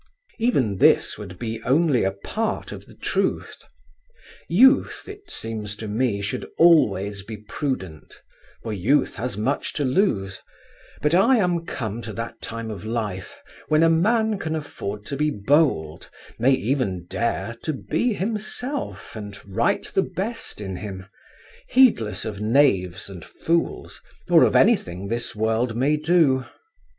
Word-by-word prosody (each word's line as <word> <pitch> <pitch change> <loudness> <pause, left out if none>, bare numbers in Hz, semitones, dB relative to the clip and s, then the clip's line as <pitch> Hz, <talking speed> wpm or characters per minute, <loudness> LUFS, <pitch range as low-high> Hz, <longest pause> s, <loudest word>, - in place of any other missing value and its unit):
Even 130 - +1
this - - +4
would 95 -4 -8
be 115 +1 -4
only 140 +1 +2
a 95 - +2
part 215 - -3
of - - -9
the - - -16
truth. - - -2 0.9
Youth 260 - +4
it 410 0 -11
seems 110 -2 -4
to 110 +1 -7
me 105 -1 0
should 100 - -4
always 105 - +4
be 110 +2 -8
prudent, 105 - -5 0.4
for 110 - -3
youth 130 +9 +2
has 120 -4 -3
much 125 +7 -1
to 145 - -1
lose: 115 - 0 0.6
but 150 +2 +2
I 230 +9 +5
am 175 -5 0
come 115 -2 -4
to 110 -1 -7
that 115 +1 -6
time 115 -1 -5
of 100 -3 -7
life 110 -4 -4 0.3
when 155 +1 +3
a 165 - +5
man 220 +5 +2
can 160 -3 -2
afford 105 -9 -6
to 140 - -4
be 150 +2 +1
bold, 115 - +1 0.3
may 130 +4 +4
even 120 -8 -1
dare 115 +4 -2
to 155 - -2
be 230 - -1
himself 225 - -4
and 105 -2 -7
write 100 +4 0
the 195 - +3
best 200 - -5
in 95 -3 -5
him, 95 -2 -7 0.6
heedless 225 - +3
of 105 -2 -5
knaves 105 -6 +2
and 95 -4 -9
fools 170 +1 -2 0.3
or - - +7
of - - 0
anything 90 +3 +2
this 120 +1 -2
world 110 +2 0
may 140 +5 +2
do. 155 -4 +3
120 Hz, 145 wpm, -23 LUFS, 105-160 Hz, 0.9 s, or